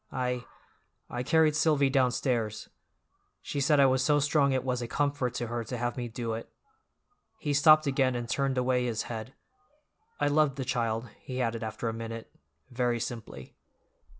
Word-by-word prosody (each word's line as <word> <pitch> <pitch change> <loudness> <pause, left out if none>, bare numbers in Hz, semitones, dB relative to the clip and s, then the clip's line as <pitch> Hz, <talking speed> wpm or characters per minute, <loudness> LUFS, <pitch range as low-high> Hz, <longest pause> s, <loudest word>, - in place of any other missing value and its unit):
"I—I 125 -1 -6
carried 155 +3 +3
Silvy 150 -3 +3
downstairs; 125 -4 0 0.7
she 140 - -4
said 145 +1 +4
I 140 - +7
was 130 0 +3
so 145 +1 +3
strong 145 -1 +3
it 130 -1 0
was 125 -1 -1
a 120 - -3
comfort 140 -1 -1
to 120 - -2
her 120 0 -3
to 125 +3 -4
have 120 0 -2
me 125 -2 -3
do 115 0 -4
it." 115 - -6 0.9
He 150 -8 -2
stopped 155 +2 +6
again 135 -2 +1
and 120 -1 -3
turned 135 +1 0
away 125 0 +2
his 115 -2 -2
head. 115 +2 -7 0.8
"I - - +2
loved 145 -1 +3
the 135 -2 -4
child," 115 -2 -1
he 130 -1 -6
added 115 -2 -1
after 110 +1 -4
a 115 - -1
minute, 115 0 -7 0.4
very 120 -1 0
simply. 110 - -7
125 Hz, 170 wpm, -29 LUFS, 115-140 Hz, 0.9 s, I